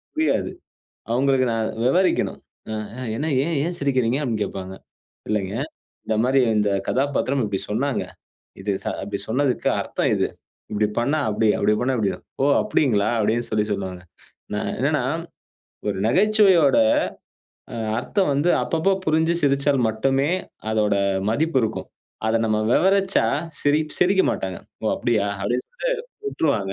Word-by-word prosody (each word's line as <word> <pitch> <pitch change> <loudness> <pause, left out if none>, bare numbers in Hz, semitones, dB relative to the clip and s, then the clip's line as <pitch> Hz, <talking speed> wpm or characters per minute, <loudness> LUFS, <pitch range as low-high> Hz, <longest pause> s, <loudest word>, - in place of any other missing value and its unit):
புரியாது. 315 +1 +1 0.6
அவுங்களுக்கு 130 +1 +2
நான் 115 -1 0 0.2
விவரிக்கணும். 180 +8 +2 0.3
அ, - - -2 0.2
ஆ - - -6
என்ன 150 +7 -2 0.2
ஏன் 165 +2 -1
ஏன் 175 +2 -2
சிரிக்கிறீங்க 130 -3 +1
அப்பிடின்னு 115 -6 -2
கேப்பாங்க. 95 -1 -6 0.5
இல்லேங்க. 100 -2 -1 0.5
இந்தமாரி 120 +5 +2 0.2
இந்தக் 100 -2 +1
கதாபாத்திரம் 140 0 0
இப்பிடி 100 -2 -2
சொன்னாங்க. 130 +6 0 0.6
இது 100 +1 -1
ச - - -9 0.2
அப்பிடி 100 0 -4
சொன்னதுக்கு 130 +2 +1
அர்த்தம் - - -1
இது. - - +1 0.4
இப்பிடி 105 0 +1
பண்ணா 140 +6 +1
அப்பிடி 110 +1 +1
அப்பிடி - - +2
பண்ணா 130 +2 +1
இப்பிடிதான். 100 -3 -2 0.2
ஓ! - - +4 0.2
அப்பிடிங்களா! 110 -9 +2
அப்பிடின்னு 115 +2 +1
சொல்லிச் 105 0 0
சொல்லுவாங்க. 95 -3 -4 0.5
நான் - - -2
என்னன்னா, - - +1 0.9
ஒரு 100 - -1
நகைச்சுவையோட, 190 - +4 1.0
அ - - -5 0.2
அர்த்தம் 185 - 0
வந்து 150 +5 +2
அப்பப்ப 170 +4 +1
புரிஞ்சு 160 +2 +2
சிரிச்சால் 140 -1 +2
மட்டுமே 135 +7 +1 0.4
அதோட 105 -2 +2 0.4
மதிப்பு 155 +4 +1
இருக்கும். 110 - -4 0.4
அத 115 - +2
நம்ம 110 -1 +1
விவரிச்சா 195 - +3 0.4
சிரி 145 +2 +3 0.2
சிரிக்க 190 +2 +4
மாட்டாங்க. 95 -2 -4 0.2
ஓ! - - +1
அப்பிடியா 110 -4 +1 0.2
அப்பிடின் 120 +5 -1 0.2
சொல்டு - - +1 0.3
விட்டுருவாங்க. 110 - 0
125 Hz, 135 wpm, -23 LUFS, 105-150 Hz, 1.0 s, ஓ